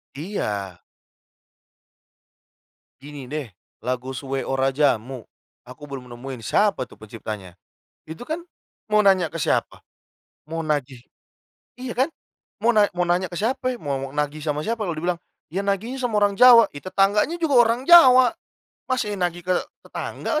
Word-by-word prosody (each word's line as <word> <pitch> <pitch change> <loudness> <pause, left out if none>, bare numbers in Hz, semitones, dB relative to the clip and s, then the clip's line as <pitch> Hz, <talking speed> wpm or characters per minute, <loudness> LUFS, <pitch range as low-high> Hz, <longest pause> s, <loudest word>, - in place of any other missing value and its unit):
Iya. 105 - -4 2.2
Gini 140 -2 -10
deh, 150 -3 -3 0.3
lagu 125 +2 -3
Suwe 135 0 -4
Ora 135 0 0
Jamu 130 -4 0 0.4
aku 130 +4 -12
belum 130 -3 -8
nemuin 125 0 -8
siapa 200 - +2
tuh 125 - -15
penciptanya, 105 -4 -8 0.5
itu 160 +9 -8
kan 315 +6 -4 0.5
mau 210 -1 +3
nanya 190 -4 +4
ke 160 - -15
siapa? 160 - -1 0.6
Mau 165 +2 -5
nagih 145 -5 -2 0.8
iya 250 -2 -5
kan? 265 +7 +1 0.5
Mau 235 0 +2
na 210 -1 +4
mau 180 0 -1
nanya 180 +2 0
ke 175 - -5
siapa? 250 +2 -1
Mau 135 -4 -4
nagih 150 +1 -3
sama 150 -1 -1
siapa? 220 +7 -2
Lalu 175 -5 -3
dibilang, 175 0 -1 0.3
"Ya 190 +6 -3
nagih 200 +6 -2
sama 245 -5 0
orang 205 -1 +2
Jawa," 235 -1 +8
ya 145 - -7
tetangganya 200 - +2
juga 320 -5 +1
orang 230 +2 0
Jawa. 260 -4 +8 0.5
Masa 255 -1 0
iya 205 - -4
nagih 175 -1 -2
ke 185 - +1 0.3
tetangga? 305 - -3
165 Hz, 145 wpm, -23 LUFS, 135-215 Hz, 2.2 s, Jawa